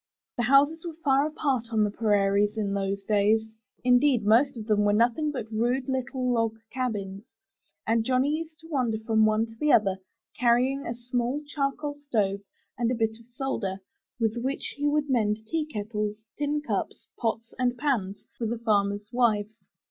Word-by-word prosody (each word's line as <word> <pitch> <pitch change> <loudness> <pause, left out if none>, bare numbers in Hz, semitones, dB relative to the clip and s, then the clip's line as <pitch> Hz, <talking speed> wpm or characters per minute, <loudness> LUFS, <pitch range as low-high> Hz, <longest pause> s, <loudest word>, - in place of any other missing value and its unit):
The - - -1
houses 285 +5 +4
were 335 -2 -6
far 275 +1 +3
apart 275 -6 -1
on 220 -1 +3
the 205 - 0
prairies 205 -1 +2
in 205 -2 -1
those 195 0 -2
days. 210 +2 +2 0.4
Indeed, 250 -2 +4
most 245 +5 +4
of 220 - -6
them 215 -2 +2
were 205 0 +3
nothing 240 +8 +2
but 240 -6 -5
rude 245 +4 0
little 260 -1 -2
log 230 -1 +1 0.2
cabins, 205 -6 -3 0.6
and 225 0 +2
Johnny 260 +5 +2
used 320 0 -6
to 325 - -13
wander 250 -8 0
from 220 0 +2
one 215 +1 +2
to 225 - -11
another, 210 -10 +4 0.4
carrying 250 +3 +2
a 235 - -3
small 245 +4 -2
charcoal 290 0 -2
stove 220 -9 -1 0.4
and 235 -1 +2
a 250 - +1
bit 225 -1 -1
of 230 - -18
solder, 235 -7 -3 0.4
with 225 0 0
which 265 +3 -3
he 290 +1 -1
would 295 0 +1
mend 220 -4 0
tea 310 +6 -2
kettles, 210 -3 -4
tin 295 +1 -1
cups, - - -3
pots, 225 -1 -2
and 250 -1 +1
pans 230 -9 -1
for 230 - -3
the 235 +2 -2
farmers' 205 -2 0
wives. 220 -3 +1
235 Hz, 170 wpm, -27 LUFS, 215-270 Hz, 0.6 s, houses